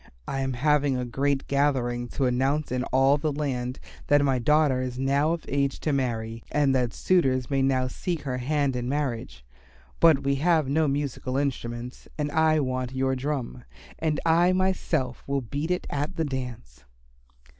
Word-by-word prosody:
I 135 Hz, -, -2 dB
am 135 Hz, -1 st, -1 dB
having 145 Hz, +1 st, +2 dB
a 125 Hz, -, -2 dB
great 135 Hz, +3 st, 0 dB
gathering 130 Hz, -4 st, 0 dB
to 135 Hz, -, +2 dB
announce 135 Hz, +4 st, +1 dB
to 125 Hz, 0 st, -1 dB
all 135 Hz, +2 st, +3 dB
the 155 Hz, +1 st, 0 dB
land 130 Hz, -4 st, -3 dB, 0.3 s
that 145 Hz, 0 st, +4 dB
my 135 Hz, -2 st, +2 dB
daughter 145 Hz, 0 st, +3 dB
is 125 Hz, -1 st, -4 dB
now 140 Hz, +4 st, +2 dB
of 170 Hz, -, -5 dB
age 140 Hz, 0 st, 0 dB
to 155 Hz, -, 0 dB
marry 115 Hz, -4 st, -2 dB
and 145 Hz, -2 st, +2 dB
that 125 Hz, -3 st, +1 dB
suitors 135 Hz, -, +1 dB
may 135 Hz, -1 st, +2 dB
now 130 Hz, -1 st, +2 dB
seek 165 Hz, +5 st, -4 dB
her 130 Hz, -2 st, -3 dB
hand 140 Hz, 0 st, 0 dB
in 125 Hz, 0 st, -2 dB
marriage. 120 Hz, -, -3 dB, 0.5 s
But 160 Hz, -4 st, +5 dB
we 140 Hz, 0 st, +1 dB
have 160 Hz, -1 st, +2 dB
no 155 Hz, +3 st, +2 dB
musical 135 Hz, -2 st, -2 dB
instruments 125 Hz, -3 st, -3 dB
and 145 Hz, -1 st, -2 dB
I 160 Hz, 0 st, +3 dB
want 130 Hz, -1 st, -2 dB
your 130 Hz, 0 st, +1 dB
drum, 130 Hz, -2 st, -3 dB, 0.4 s
and 155 Hz, -2 st, 0 dB
I 170 Hz, +2 st, +4 dB
myself 175 Hz, -8 st, 0 dB
will 140 Hz, 0 st, 0 dB
beat 140 Hz, +7 st, -4 dB
it 180 Hz, 0 st, -1 dB
at 145 Hz, +6 st, -2 dB
the 165 Hz, -2 st, 0 dB
dance." 120 Hz, -, -6 dB
135 Hz, 175 wpm, -26 LUFS, 125-150 Hz, 0.5 s, But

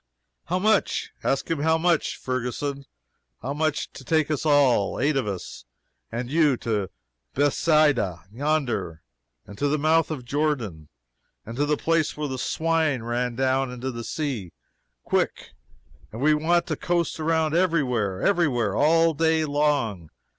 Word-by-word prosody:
"How 180 Hz, -, -1 dB
much? 210 Hz, +2 st, +1 dB
ask 135 Hz, -, 0 dB
him 165 Hz, -, 0 dB
how 160 Hz, +2 st, +2 dB
much, 170 Hz, -1 st, +1 dB
Ferguson! 130 Hz, +2 st, -3 dB, 0.6 s
how 135 Hz, -, -2 dB
much 150 Hz, 0 st, -1 dB
to -, -, -11 dB
take 155 Hz, +2 st, +1 dB
us 155 Hz, +1 st, -1 dB
all 135 Hz, -9 st, +3 dB
eight 145 Hz, +4 st, +2 dB
of 130 Hz, -5 st, 0 dB
us, 95 Hz, -9 st, -6 dB, 0.5 s
and 120 Hz, +2 st, -3 dB
you 150 Hz, -2 st, +3 dB
to 105 Hz, -5 st, -2 dB, 0.5 s
Bethsaida, 145 Hz, -, +2 dB
yonder, 120 Hz, -, -2 dB, 0.4 s
and 100 Hz, 0 st, -12 dB
to 145 Hz, -, +1 dB
the 150 Hz, +2 st, +1 dB
mouth 160 Hz, +2 st, +2 dB
of 140 Hz, -6 st, -5 dB
Jordan, 120 Hz, -, -2 dB, 0.6 s
and 115 Hz, -, -7 dB
to 145 Hz, +3 st, 0 dB
the 150 Hz, 0 st, +1 dB
place 165 Hz, -2 st, 0 dB
where 150 Hz, -1 st, -2 dB
the 130 Hz, -2 st, -4 dB
swine 160 Hz, -4 st, 0 dB
ran 120 Hz, +1 st, -2 dB
down 130 Hz, +1 st, +1 dB
into 125 Hz, +1 st, -4 dB
the 115 Hz, -1 st, -6 dB
sea 130 Hz, -, -4 dB, 0.5 s
quick! -, -, -1 dB, 0.6 s
and 110 Hz, -, -8 dB
we 150 Hz, +3 st, +4 dB
want 170 Hz, +3 st, +2 dB
to -, -, -2 dB
coast 170 Hz, -3 st, -1 dB
around 160 Hz, -1 st, +1 dB
every 170 Hz, -3 st, +2 dB
where 105 Hz, -7 st, -2 dB
every 175 Hz, -5 st, +3 dB
where! 120 Hz, -7 st, -1 dB
all 165 Hz, +2 st, +4 dB
day 160 Hz, +1 st, +2 dB
long! 145 Hz, -, 0 dB
145 Hz, 155 wpm, -25 LUFS, 120-155 Hz, 0.6 s, we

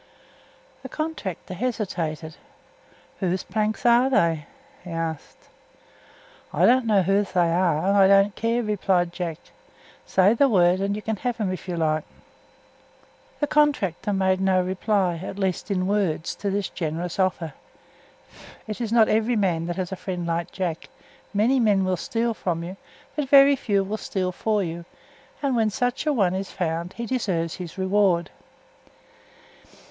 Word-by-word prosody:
The 265 Hz, -, -8 dB
contractor 285 Hz, -, -5 dB
hesitated. 175 Hz, -8 st, -3 dB, 0.8 s
"Whose 185 Hz, -1 st, -1 dB
planks 215 Hz, +1 st, -2 dB
are 240 Hz, +2 st, +5 dB
they?" 165 Hz, -, +1 dB, 0.4 s
he 180 Hz, -, -10 dB
asked. 165 Hz, -2 st, -5 dB, 1.0 s
"I -, -, +3 dB
don't 250 Hz, -1 st, +4 dB
know 205 Hz, -3 st, +4 dB
whose 195 Hz, +2 st, +1 dB
they 175 Hz, -2 st, +3 dB
are, 170 Hz, -2 st, +1 dB
and 200 Hz, -, +3 dB
I 195 Hz, -1 st, +6 dB
don't 195 Hz, +1 st, +5 dB
care," 230 Hz, +1 st, 0 dB
replied 190 Hz, -5 st, 0 dB
Jack. 170 Hz, -4 st, -4 dB, 0.7 s
"Say 190 Hz, +3 st, +4 dB
the 275 Hz, +4 st, +3 dB
word, 180 Hz, -4 st, +4 dB
and 200 Hz, +1 st, 0 dB
you 210 Hz, -, -6 dB
can 220 Hz, -1 st, -2 dB
have 245 Hz, +3 st, -2 dB
them, 205 Hz, -5 st, -1 dB
if 185 Hz, -, -8 dB
you 175 Hz, -2 st, -3 dB
like." 155 Hz, -1 st, +1 dB, 1.4 s
The -, -, +3 dB
contractor 285 Hz, -, +1 dB
made 190 Hz, -1 st, +1 dB
no 190 Hz, -1 st, +3 dB
reply, 185 Hz, -2 st, 0 dB
at 190 Hz, -, -6 dB
least 190 Hz, -1 st, -2 dB
in 185 Hz, -2 st, 0 dB
words, 190 Hz, -5 st, 0 dB
to 200 Hz, -, -2 dB
this 200 Hz, 0 st, -1 dB
generous 165 Hz, +2 st, -4 dB
offer. 180 Hz, -4 st, 0 dB, 1.1 s
It 215 Hz, +2 st, -6 dB
is 225 Hz, -2 st, -2 dB
not 230 Hz, -2 st, +5 dB
every 225 Hz, +3 st, +1 dB
man 175 Hz, -6 st, 0 dB
that 175 Hz, -, -3 dB
has 185 Hz, 0 st, -3 dB
a -, -, -2 dB
friend 180 Hz, -1 st, -5 dB
like 170 Hz, 0 st, -2 dB
Jack; 175 Hz, -4 st, -4 dB, 0.4 s
many 225 Hz, +6 st, +2 dB
men 205 Hz, -5 st, +3 dB
will 185 Hz, 0 st, +1 dB
steal 230 Hz, +6 st, -1 dB
from 170 Hz, -5 st, -3 dB
you, 180 Hz, +3 st, -6 dB, 0.4 s
but 285 Hz, -3 st, -2 dB
very 280 Hz, 0 st, +7 dB
few 200 Hz, -6 st, 0 dB
will 205 Hz, +3 st, -3 dB
steal 185 Hz, -3 st, -2 dB
for 210 Hz, +2 st, 0 dB
you, 170 Hz, 0 st, -5 dB, 0.6 s
and 275 Hz, -3 st, +1 dB
when 220 Hz, -2 st, +2 dB
such 245 Hz, +6 st, -2 dB
a -, -, +4 dB
one 195 Hz, -10 st, +2 dB
is 190 Hz, 0 st, -3 dB
found 170 Hz, 0 st, -3 dB
he 235 Hz, -, -5 dB
deserves 185 Hz, -10 st, -2 dB
his 175 Hz, -2 st, -8 dB
reward. 190 Hz, -2 st, +2 dB
195 Hz, 160 wpm, -24 LUFS, 175-220 Hz, 1.4 s, very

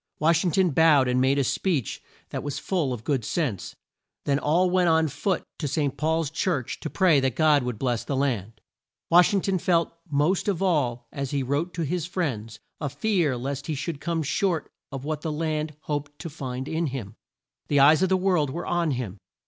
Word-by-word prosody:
Wash 165 Hz, +2 st, +3 dB
ing 180 Hz, -, +2 dB
ton 180 Hz, +1 st, +2 dB
bowed 150 Hz, -3 st, +5 dB
and 125 Hz, 0 st, +2 dB
made 135 Hz, +2 st, +3 dB
a 140 Hz, -, +3 dB
speech 150 Hz, -, -1 dB, 0.3 s
that -, -, -3 dB
was 145 Hz, -1 st, -4 dB
full 170 Hz, -9 st, -1 dB
of 120 Hz, -3 st, -5 dB
good 135 Hz, -4 st, 0 dB
sense. 115 Hz, -, -2 dB, 0.5 s
Then 140 Hz, 0 st, +2 dB
all 170 Hz, +6 st, +2 dB
went 180 Hz, -1 st, +3 dB
on 160 Hz, 0 st, +3 dB
foot 185 Hz, +6 st, -1 dB, 0.2 s
to 150 Hz, -, -2 dB
St. 140 Hz, -1 st, -1 dB
Paul's 160 Hz, -1 st, 0 dB
Church 160 Hz, -6 st, -1 dB
to 155 Hz, -, -5 dB
pray 175 Hz, -6 st, +4 dB
that 130 Hz, -3 st, 0 dB
God 155 Hz, -2 st, +4 dB
would 125 Hz, -3 st, -3 dB
bless 120 Hz, -1 st, -1 dB
the 140 Hz, -, -3 dB
land. 115 Hz, -6 st, -1 dB, 0.5 s
Wash 175 Hz, +1 st, +7 dB
ing 200 Hz, -2 st, +2 dB
ton 190 Hz, -1 st, 0 dB
felt 170 Hz, -1 st, +1 dB, 0.2 s
most 150 Hz, +8 st, +1 dB
of 195 Hz, -5 st, 0 dB
all 130 Hz, -11 st, 0 dB
as 140 Hz, -3 st, -4 dB
he 140 Hz, -1 st, -1 dB
wrote 145 Hz, +7 st, -1 dB
to 170 Hz, -, -1 dB
his 170 Hz, +2 st, -2 dB
friends, 115 Hz, -, -3 dB, 0.2 s
a 145 Hz, -, -2 dB
fear 150 Hz, -, 0 dB
lest 135 Hz, +3 st, -4 dB
he 155 Hz, -, -1 dB
should 145 Hz, +1 st, -4 dB
come 165 Hz, -2 st, -1 dB
short 170 Hz, +3 st, -1 dB, 0.2 s
of 135 Hz, 0 st, -6 dB
what 155 Hz, -1 st, -3 dB
the 160 Hz, -, -2 dB
land 155 Hz, -1 st, -2 dB
hoped 145 Hz, -1 st, -4 dB
to 165 Hz, -, -7 dB
find 130 Hz, -3 st, -5 dB
in 160 Hz, +1 st, -1 dB
him. 120 Hz, -6 st, -6 dB, 0.5 s
The 145 Hz, -, +3 dB
eyes 150 Hz, +4 st, +6 dB
of 190 Hz, -, +3 dB
the 190 Hz, -, +3 dB
world 180 Hz, -6 st, +2 dB
were 170 Hz, +6 st, -5 dB
on 175 Hz, -2 st, 0 dB
him. 120 Hz, -8 st, -3 dB
150 Hz, 210 wpm, -25 LUFS, 135-170 Hz, 0.5 s, Wash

